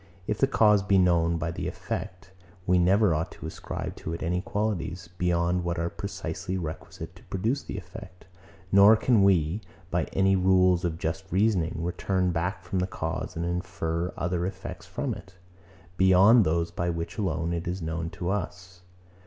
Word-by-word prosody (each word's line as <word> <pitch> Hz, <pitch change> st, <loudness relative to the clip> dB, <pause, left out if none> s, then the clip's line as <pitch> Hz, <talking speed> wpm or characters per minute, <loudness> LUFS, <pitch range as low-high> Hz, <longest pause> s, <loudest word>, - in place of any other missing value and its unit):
If 105 Hz, +2 st, -2 dB
the 135 Hz, -, +4 dB
cause 105 Hz, -6 st, +4 dB
be 95 Hz, 0 st, +2 dB
known 85 Hz, -3 st, +4 dB
only -, -, 0 dB
by 80 Hz, 0 st, -2 dB
the -, -, -4 dB
effect, 90 Hz, +1 st, -6 dB, 0.3 s
we 90 Hz, -1 st, +3 dB
never 95 Hz, +1 st, +4 dB
ought 80 Hz, +1 st, -2 dB
to -, -, -10 dB
ascribe -, -, -5 dB
to 80 Hz, -, -5 dB
it 85 Hz, -, -5 dB
any 90 Hz, +2 st, 0 dB
qualities, 90 Hz, -5 st, -3 dB
beyond 90 Hz, 0 st, +1 dB
what 85 Hz, 0 st, -2 dB
are 85 Hz, +1 st, -1 dB
precisely 95 Hz, -, -4 dB
requisite 80 Hz, -3 st, -7 dB
to -, -, -17 dB
produce 110 Hz, +9 st, -1 dB
the -, -, -7 dB
effect: 90 Hz, -1 st, -10 dB, 0.5 s
Nor 100 Hz, +3 st, +8 dB
can 110 Hz, 0 st, +3 dB
we, 90 Hz, 0 st, +3 dB, 0.3 s
by 85 Hz, -2 st, +1 dB
any 95 Hz, 0 st, +2 dB
rules 90 Hz, -1 st, +4 dB
of 85 Hz, -2 st, -1 dB
just 85 Hz, +4 st, -4 dB
reasoning, 95 Hz, -4 st, +2 dB
return 90 Hz, +1 st, 0 dB
back 90 Hz, +3 st, -2 dB
from 95 Hz, +1 st, -2 dB
the 90 Hz, -, 0 dB
cause, 80 Hz, -3 st, -4 dB
and 85 Hz, +1 st, -2 dB
infer 85 Hz, 0 st, -2 dB
other 90 Hz, 0 st, -1 dB
effects 95 Hz, 0 st, -7 dB
from -, -, -3 dB
it, 95 Hz, +1 st, -12 dB, 0.6 s
beyond 95 Hz, +5 st, +6 dB
those 85 Hz, +1 st, 0 dB
by 85 Hz, 0 st, -2 dB
which 85 Hz, +4 st, -4 dB
alone 85 Hz, -4 st, -1 dB
it 85 Hz, 0 st, -3 dB
is 90 Hz, +2 st, -2 dB
known 80 Hz, 0 st, -3 dB
to 90 Hz, +1 st, -4 dB
us. 90 Hz, -2 st, -5 dB
90 Hz, 180 wpm, -27 LUFS, 85-95 Hz, 0.6 s, Nor